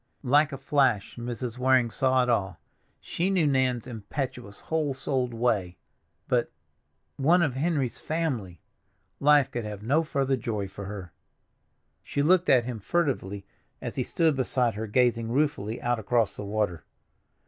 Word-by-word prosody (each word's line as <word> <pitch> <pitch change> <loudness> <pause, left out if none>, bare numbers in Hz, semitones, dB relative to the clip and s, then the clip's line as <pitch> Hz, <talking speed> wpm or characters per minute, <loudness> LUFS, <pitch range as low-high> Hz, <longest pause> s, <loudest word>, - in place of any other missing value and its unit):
Like 145 +4 +4
a 135 - -5
flash 135 -6 +1
Mrs. 120 0 -5
Waring 130 -2 +3
saw 130 +1 +2
it - - -2
all. 100 -5 0 0.4
She 175 +3 -1
knew 185 -5 +2
Nan's 130 -4 +1
impetuous, 120 -1 -5
whole 155 -4 -1
souled 130 -2 -1
way; 110 -7 0 0.5
but—One 80 - -1
of 150 -5 0
Henry's 140 -3 -1
family! 130 - -2 0.6
Life 145 -2 +4
could 120 -2 -3
have 105 -1 -7
no 140 +8 +3
further 135 -3 0
joy 105 -5 -3
for 100 +1 -8
her. 95 -3 -7 0.9
She 140 - -1
looked 180 +3 +4
at 120 -3 +5
him 120 -3 -4
furtively 100 - -1 0.3
as - - -6
he - - 0
stood 160 -3 +1
beside 125 -2 +1
her 110 +2 -4
gazing 115 0 +2
ruefully 125 -6 0
out 120 -1 +1
across 110 -1 +1
the 105 - -6
water. 100 -5 -1
125 Hz, 150 wpm, -27 LUFS, 105-140 Hz, 0.9 s, at